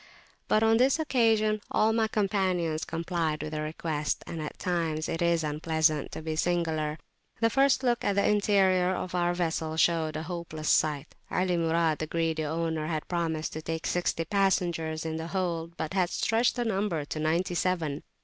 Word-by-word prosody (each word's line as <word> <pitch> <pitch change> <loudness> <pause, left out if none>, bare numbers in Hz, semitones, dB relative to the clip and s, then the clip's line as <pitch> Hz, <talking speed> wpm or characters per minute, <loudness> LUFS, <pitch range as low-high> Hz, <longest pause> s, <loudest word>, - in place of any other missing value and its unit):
But 215 - +3
on 225 0 +4
this 260 +4 +4
occasion 225 -8 +2
all 220 +1 +2
my 225 -1 +2
companions 190 -7 0
complied 165 -2 -2
with 155 - -5
the 155 -1 -3
request, 155 -1 -2
and 165 - -5
at 150 - -6
times 165 -3 -1
it 165 - -3
is 170 -1 +2
unpleasant 155 0 0
to - - -6
be 160 0 -3
singular. 160 -3 0 0.4
The 230 0 +2
first 270 +1 +3
look 240 -1 +1
at 205 - +1
the 200 - +3
interior 190 -3 +3
of 180 - -5
our 175 -1 +1
vessel 160 -2 -2
showed 160 -2 +2
a 155 - -3
hopeless 165 -3 -4
sight; 150 -1 +1 0.2
Ali 185 -1 +1
Murad, 165 -1 +1
the 155 - -3
greedy 165 -1 -1
owner, 160 0 -2
had 155 -2 -3
promised 165 -3 -2
to 155 - -5
take 160 +1 -4
sixty 175 -2 0
passengers 170 -4 0
in 160 0 -2
the 160 0 -4
hold, 170 -2 -3
but 160 +3 -3
had 185 -3 +2
stretched 230 +5 +1
the 245 -1 -1
number 195 -8 -1
to 155 - -5
ninety 165 +4 0
seven. 170 -5 -1
170 Hz, 180 wpm, -28 LUFS, 160-190 Hz, 0.4 s, on